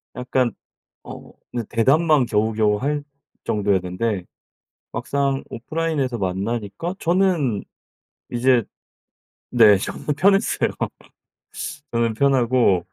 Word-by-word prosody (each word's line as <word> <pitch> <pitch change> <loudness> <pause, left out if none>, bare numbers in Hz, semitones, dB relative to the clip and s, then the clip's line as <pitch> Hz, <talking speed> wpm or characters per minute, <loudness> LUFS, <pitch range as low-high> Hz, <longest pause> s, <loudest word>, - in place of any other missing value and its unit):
약간 125 -1 0 0.5
어 - - -11 0.2
그냥 120 -3 -4
대답만 140 +5 +3
겨우겨우 105 -1 +1
할 145 +5 -2 0.4
정도였는데 100 0 0 0.7
막상 140 -1 -1
오프라인에서 140 -2 -2
만나니까 100 - -3
저는 170 - +1 0.7
이제 120 0 +3 0.9
네. 110 -4 +6
저는 95 - -6
편했어요. 195 +2 +3 1.2
저는 115 -1 +1
편하고 120 -8 +3
120 Hz, 215 characters per minute, -22 LUFS, 105-140 Hz, 1.2 s, 네